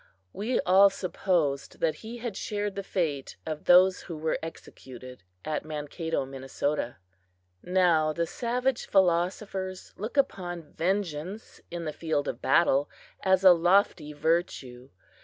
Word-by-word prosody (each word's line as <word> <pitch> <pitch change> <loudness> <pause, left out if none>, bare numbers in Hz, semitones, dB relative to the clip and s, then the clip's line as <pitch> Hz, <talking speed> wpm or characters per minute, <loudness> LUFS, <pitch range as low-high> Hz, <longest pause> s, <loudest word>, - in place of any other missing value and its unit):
We 225 +5 -1
all 195 +2 +6
supposed 175 -7 -1
that 160 -1 0
he 230 +2 -7
had 235 -4 -5
shared 205 0 -3
the 200 - -4
fate 160 -8 -2
of 155 -1 -5
those 185 +1 +6
who 165 -4 -7
were 155 +1 -1
executed 130 -6 -10 0.2
at 155 -1 -2
Mankato, 155 0 -3
Minnesota. 135 -1 -3 0.6
Now 175 -4 +3
the 170 +2 -1
savage 245 +6 -1
philosophers 185 +1 0
looked 220 +7 -6
upon 175 - -1
vengeance 185 +2 -3
in 170 -1 -5
the 155 - -3
field 160 -3 -1
of - - -4
battle 145 -4 +3 0.3
as 190 0 +3
a 185 - +10
lofty 175 -2 +2
virtue. 145 -5 -2
175 Hz, 130 wpm, -28 LUFS, 150-195 Hz, 0.6 s, a